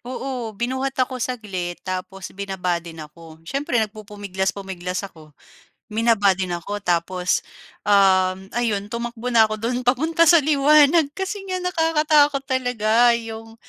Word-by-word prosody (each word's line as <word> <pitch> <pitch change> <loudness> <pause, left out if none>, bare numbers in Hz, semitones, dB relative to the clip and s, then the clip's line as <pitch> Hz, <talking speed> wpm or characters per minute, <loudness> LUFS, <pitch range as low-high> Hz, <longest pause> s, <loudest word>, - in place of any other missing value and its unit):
Oo, 245 -3 -5
binuhat 260 +3 -2
ako 255 0 -1
saglit 195 -8 -4
tapos 185 +1 -6
binaba 190 -3 -2
din 170 -1 -10
ako. 160 +1 -12
Siyempre 275 - -2
nagpupumiglas-pumiglas 195 -3 -5
ako, 155 -4 -17 0.6
binaba 220 -3 +3
din 185 -1 -3
ako. 200 +4 -4
Tapos, 180 +1 0 0.5
uhm, 190 -1 +3
ayun 210 -4 -1
tumakbo 235 +1 -4
na 225 -2 +6
ako 215 - -3
do'n 245 +2 -1
papunta 320 +7 +2
sa 335 0 +7
liwanag 300 +2 +5
kasi 390 +2 -3
nga 370 -1 -3
nakakatakot 305 -5 +2
talaga 245 -3 +2
'yong 225 -1 -8
225 Hz, 125 wpm, -22 LUFS, 190-260 Hz, 0.6 s, sa